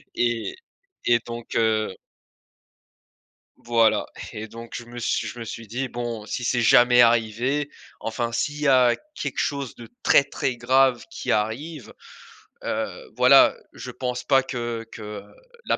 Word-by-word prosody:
et 120 -2 -1 0.5
et 120 0 +4
donc 120 0 -7
heu 110 -3 +1 1.6
voilà 115 -2 +2 0.3
et 110 +1 -6
donc 115 +1 -11
je 120 - -6
me 120 +1 -9
suis 115 - -1
je - - -8
me - - -4
suis 115 -1 -8
dit: 130 +5 -3
«Bon, 120 -3 -5
si 120 +3 -4
c'est 120 0 +1
jamais 120 +1 +6
arrivé, 120 +5 +2 0.3
enfin, 115 +1 -3
s'il 145 +5 -2
y 150 - +1
a 125 -3 +5 0.2
quelque - - -4
chose 140 -3 -2
de 115 -2 -12
très, 140 - +6
très 125 - -3
grave 130 +1 +3
qui 170 - -4
arrive, 120 +7 -2 0.7
heu, - - -4
voilà, - - +7 0.2
je - - -8
pense 125 -1 -4
pas 135 0 +4
que 120 -3 -4
que 105 -1 -7 0.4
la - - +1
120 Hz, 150 wpm, -24 LUFS, 115-130 Hz, 1.6 s, voilà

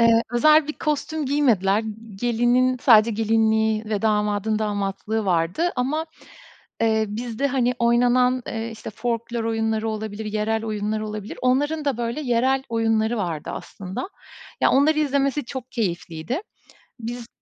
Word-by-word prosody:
Eee, 230 0 +5
özel 305 +5 +5
bir - - -1
kostüm 300 0 -2
giymediler. 225 -8 +2 0.3
Gelinin 240 +4 +2
sadece 230 -3 +6
gelinliği 220 0 +2
ve 210 -2 -2
damadın 210 0 +1
damatlığı 210 +1 -2
vardı 180 - +1
ama, 300 +6 -1 0.7
eee, 220 -1 +2
bizde, 230 +5 -2
hani, 250 -2 +1
oynanan, 245 +1 +3
eee, 225 0 -4
işte, 225 - -8
folklor 235 +1 -3
oyunları 225 -1 0
olabilir, 215 0 -4
yerel 215 +1 -1
oyunlar 215 0 -2
olabilir. 215 -1 -6
Onların 290 +5 +1
da 280 -4 0
böyle 235 +4 -2
yerel 260 0 +1
oyunları 225 0 +1
vardı, 170 -6 -3
aslında. 190 - -6 0.5
Ya, - - +5
onları 305 +3 +4
izlemesi 280 0 +1
çok 255 +1 -7
keyifliydi. 185 - -3 0.6
Biz 235 +1 -6
230 Hz, 130 wpm, -23 LUFS, 215-255 Hz, 0.7 s, sadece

